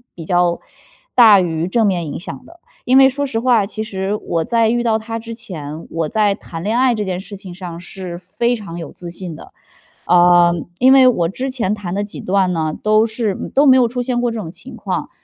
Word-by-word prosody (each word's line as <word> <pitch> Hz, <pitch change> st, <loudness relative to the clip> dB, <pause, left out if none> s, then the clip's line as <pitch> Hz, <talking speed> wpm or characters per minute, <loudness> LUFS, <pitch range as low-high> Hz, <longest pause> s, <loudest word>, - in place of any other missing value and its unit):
比 165 Hz, -, -9 dB
较 175 Hz, 0 st, +1 dB, 0.6 s
大 220 Hz, -5 st, +8 dB
于 165 Hz, -1 st, -2 dB
正 225 Hz, +4 st, +1 dB
面 180 Hz, -4 st, -1 dB
影 145 Hz, -, -5 dB
响 185 Hz, +8 st, -8 dB
的。 340 Hz, +4 st, -17 dB, 0.3 s
因 255 Hz, -, +4 dB
为 270 Hz, 0 st, +8 dB
说 285 Hz, +2 st, -2 dB
实 230 Hz, -5 st, -2 dB
话， 235 Hz, -4 st, +3 dB
其 215 Hz, +2 st, -4 dB
实 195 Hz, -1 st, -3 dB
我 165 Hz, -1 st, -2 dB
在 230 Hz, +5 st, +2 dB
遇 240 Hz, +1 st, +1 dB
到 225 Hz, -2 st, +2 dB
他 225 Hz, +1 st, -5 dB
之 230 Hz, 0 st, -8 dB
前， 160 Hz, -8 st, -6 dB
我 165 Hz, -2 st, -2 dB
在 210 Hz, -2 st, +2 dB
谈 165 Hz, -5 st, -9 dB
恋 215 Hz, +4 st, 0 dB
爱 255 Hz, -1 st, +3 dB
这 210 Hz, -, -2 dB
件 185 Hz, -1 st, -3 dB
事 200 Hz, +2 st, -8 dB
情 190 Hz, -2 st, -9 dB
上 175 Hz, -2 st, -8 dB
是 180 Hz, -1 st, -7 dB
非 210 Hz, +7 st, -1 dB
常 200 Hz, -7 st, -8 dB
有 165 Hz, -, -7 dB
自 175 Hz, -, -10 dB
信 175 Hz, -2 st, -7 dB
的。 -, -, -13 dB, 0.5 s
啊， 175 Hz, 0 st, +5 dB, 0.3 s
因 260 Hz, +1 st, +5 dB
为 265 Hz, -1 st, +7 dB
我 175 Hz, -10 st, +2 dB
之 260 Hz, +8 st, -4 dB
前 225 Hz, -6 st, -1 dB
谈 195 Hz, -4 st, -5 dB
的 205 Hz, -, -1 dB
几 205 Hz, -, -8 dB
段 190 Hz, -1 st, +1 dB
呢， 155 Hz, -2 st, -2 dB
都 215 Hz, +1 st, +4 dB
是 220 Hz, -3 st, -2 dB, 0.2 s
都 280 Hz, +2 st, +5 dB
没 260 Hz, -2 st, +7 dB
有 245 Hz, -2 st, +4 dB
出 245 Hz, +1 st, -3 dB
现 245 Hz, 0 st, -1 dB
过 245 Hz, -, +1 dB
这 230 Hz, -, -4 dB
种 165 Hz, -6 st, -6 dB
情 -, -, -12 dB
况， -, -, -4 dB
205 Hz, 250 characters per minute, -18 LUFS, 175-235 Hz, 0.6 s, 大